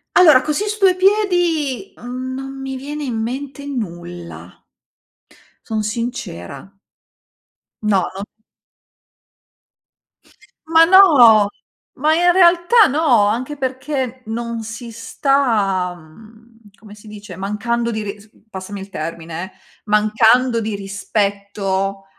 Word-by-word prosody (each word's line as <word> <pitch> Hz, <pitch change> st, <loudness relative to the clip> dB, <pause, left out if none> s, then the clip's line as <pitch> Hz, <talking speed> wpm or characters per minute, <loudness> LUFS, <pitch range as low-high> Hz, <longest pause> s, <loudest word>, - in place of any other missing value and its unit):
Allora, 310 Hz, -8 st, +7 dB
così 305 Hz, +9 st, -2 dB
su 425 Hz, -, -4 dB
due 375 Hz, -2 st, +4 dB
piedi, 355 Hz, -6 st, +1 dB
mhmm, 255 Hz, +1 st, -6 dB
non 270 Hz, 0 st, -7 dB
mi 270 Hz, 0 st, -5 dB
viene 290 Hz, +3 st, -6 dB
in 250 Hz, -4 st, -3 dB
mente 265 Hz, +5 st, -5 dB
nulla. 175 Hz, -10 st, -7 dB, 1.0 s
Son 220 Hz, -2 st, -2 dB
sincera. 210 Hz, -, -6 dB, 1.1 s
No, 200 Hz, -4 st, +1 dB
no 195 Hz, -, -6 dB, 2.4 s
Ma 325 Hz, 0 st, +6 dB
no. 270 Hz, -, +7 dB, 0.5 s
Ma 305 Hz, +4 st, +1 dB
in 350 Hz, +2 st, +4 dB
realtà 360 Hz, +5 st, +5 dB
no, 265 Hz, -8 st, +3 dB
anche 255 Hz, +8 st, -2 dB
perché 260 Hz, -1 st, -3 dB
non 230 Hz, 0 st, -4 dB
si 230 Hz, +2 st, -8 dB
sta, 225 Hz, -6 st, 0 dB
mhmm, 220 Hz, +6 st, -19 dB
come 210 Hz, -1 st, -14 dB
si 210 Hz, +1 st, -15 dB
dice 205 Hz, -3 st, -10 dB
mancando 235 Hz, +4 st, -2 dB
di 220 Hz, -1 st, -3 dB
ris 205 Hz, +1 st, -8 dB, 0.2 s
passami 195 Hz, 0 st, -8 dB
il 195 Hz, -, -9 dB
termine 165 Hz, 0 st, -6 dB
eh, 190 Hz, -, -10 dB, 0.3 s
mancando 225 Hz, +3 st, +3 dB
di 215 Hz, -1 st, -3 dB
rispetto 200 Hz, -1 st, -3 dB
230 Hz, 110 wpm, -18 LUFS, 205-280 Hz, 2.4 s, Allora